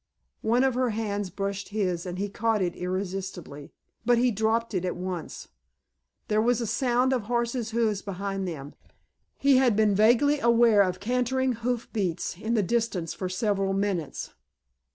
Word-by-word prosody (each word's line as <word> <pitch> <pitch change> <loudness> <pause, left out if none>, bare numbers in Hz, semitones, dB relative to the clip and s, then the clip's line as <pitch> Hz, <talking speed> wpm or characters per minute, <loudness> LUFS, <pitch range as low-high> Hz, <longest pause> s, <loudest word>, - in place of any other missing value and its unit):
One 235 +3 +2
of 265 -1 +2
her 250 0 +1
hands 205 -3 -2
brushed 195 +2 -4
his 185 -4 -1
and 180 0 -5
he 200 +2 -1
caught 220 +2 0
it 175 -1 -2
irresistibly. 185 -5 -5 0.3
But 240 +1 +4
he 245 +1 +3
dropped 220 +2 0
it 185 -2 -1
at 180 - -2
once. 180 -2 -6 0.8
There 215 0 +2
was 240 +1 +2
a 235 - -1
sound 250 +3 +1
of 245 -5 -1
horses' 235 0 -1
hoofs 220 -3 0
behind 195 -1 -4
them. 145 -4 -6 0.6
He 275 -2 +4
had 255 -4 +4
been 215 -1 +3
vaguely 240 +8 +4
aware 235 -4 +5
of 185 -2 0
cantering 250 +3 0
hoof 240 0 -2
beats 180 -6 -2
in 220 +4 -1
the 215 - +2
distance 215 -6 -1
for 185 - -4
several 195 0 0
minutes. 195 -6 -2
210 Hz, 165 wpm, -27 LUFS, 190-235 Hz, 0.8 s, aware